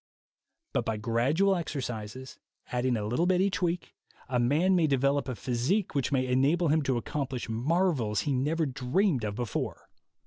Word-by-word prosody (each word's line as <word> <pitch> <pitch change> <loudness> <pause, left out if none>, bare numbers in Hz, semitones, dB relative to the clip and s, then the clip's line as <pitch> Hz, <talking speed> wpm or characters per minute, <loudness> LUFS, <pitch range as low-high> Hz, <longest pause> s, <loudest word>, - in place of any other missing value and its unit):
But - - +1
by 110 -3 -2
gradual 130 - +2
exercises, 130 - -5 0.3
adding 125 0 +1
a 105 - -3
little 125 +11 +1
bit 180 -1 +3
each 195 0 +1
week, 175 0 -1 0.4
a 125 -1 +1
man 155 +10 +3
may 170 -3 +3
develop 140 0 +1
a 125 - -3
physique 125 - -1
which 140 -3 0
may 130 -2 +2
enable 140 +7 +2
him 155 +2 +3
to 130 -2 +1
accomplish 135 0 -3
marvels 125 - +1
he 145 - -1
never 155 +5 +1
dreamed 135 - 0
of 105 -1 -2
before. 120 -3 -4
135 Hz, 165 wpm, -29 LUFS, 120-165 Hz, 0.4 s, bit